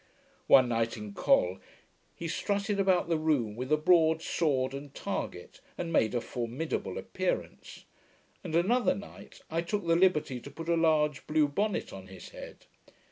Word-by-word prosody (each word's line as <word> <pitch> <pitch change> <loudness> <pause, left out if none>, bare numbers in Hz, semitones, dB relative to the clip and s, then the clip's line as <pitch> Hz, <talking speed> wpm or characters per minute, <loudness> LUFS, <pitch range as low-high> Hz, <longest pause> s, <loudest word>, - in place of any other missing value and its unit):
One 130 -2 +7
night, 115 -1 0
in 105 -1 -7
Col, 90 -2 +2 0.6
he 170 - -5
strutted 200 +4 -1
about 190 -3 +3
the 165 -2 +1
room 140 -9 0
with 130 +4 -5
a 155 - +5
broad 160 0 +4
sword 135 -5 0
and 140 0 -7
target, - - -5 0.2
and 170 -1 -4
made 115 -5 +2
a 120 - +1
formidable 125 +8 -4
appearance; - - -4 0.6
and, 165 -4 -4
another 230 +9 +3
night, 200 - -11
I 165 +1 0
took 190 +2 -3
the 165 0 +3
liberty 160 -8 +2
to 140 - -10
put 165 +4 -8
a 170 - +4
large 155 -3 +2
blue 155 -1 +3
bonnet 205 +8 -2
on 95 -1 -9
his 95 -1 -11
head. - - -11
155 Hz, 165 wpm, -30 LUFS, 130-170 Hz, 0.6 s, One